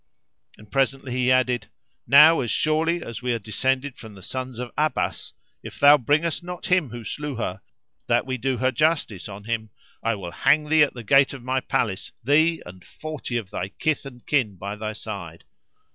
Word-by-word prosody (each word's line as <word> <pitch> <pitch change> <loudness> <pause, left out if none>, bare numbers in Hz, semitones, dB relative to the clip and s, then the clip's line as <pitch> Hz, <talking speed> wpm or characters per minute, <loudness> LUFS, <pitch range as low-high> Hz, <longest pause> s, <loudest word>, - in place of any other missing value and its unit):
And 105 - -17
presently 135 -1 0
he 125 0 +1
added, 125 -1 +2 0.2
" - - -47
Now, 150 +4 +8
as 120 - -2
surely 160 +5 +1
as 115 - -7
we 125 -1 0
are - - 0
descended 130 +5 -2
from 110 -2 -11
the 95 - -13
Sons 130 +1 -5
of 125 0 -5
Abbas, 155 +1 -1
[FN#355] - - -39 0.3
if - - -10
thou 145 +1 +8
bring 145 +6 +2
us 165 - -2
not 180 +1 -7
him 180 -8 +2
who 120 0 -8
slew 145 +6 -5
her, 95 -5 -4 0.5
that 120 +1 +2
we 130 -1 -3
do 130 +1 -1
her 130 +2 +1
justice 150 - 0
on 100 +1 -9
him, 110 0 -3 0.3
I 115 0 0
will 90 -4 -7
hang 150 - +2
thee 155 0 +5
at 145 - +3
the 120 - -7
gate 135 +5 +4
of 135 -3 -9
my 130 +1 0
palace, 100 -6 -2
thee 155 +6 +3
and 90 0 -12
forty 155 -6 -5
of 105 -5 -6
thy 95 - -3
kith 155 +5 -2
and 125 -3 -13
kin 125 -9 +1
by 100 +3 -6
thy 110 0 -4
side." 95 -7 -7
130 Hz, 205 wpm, -24 LUFS, 110-145 Hz, 0.5 s, Now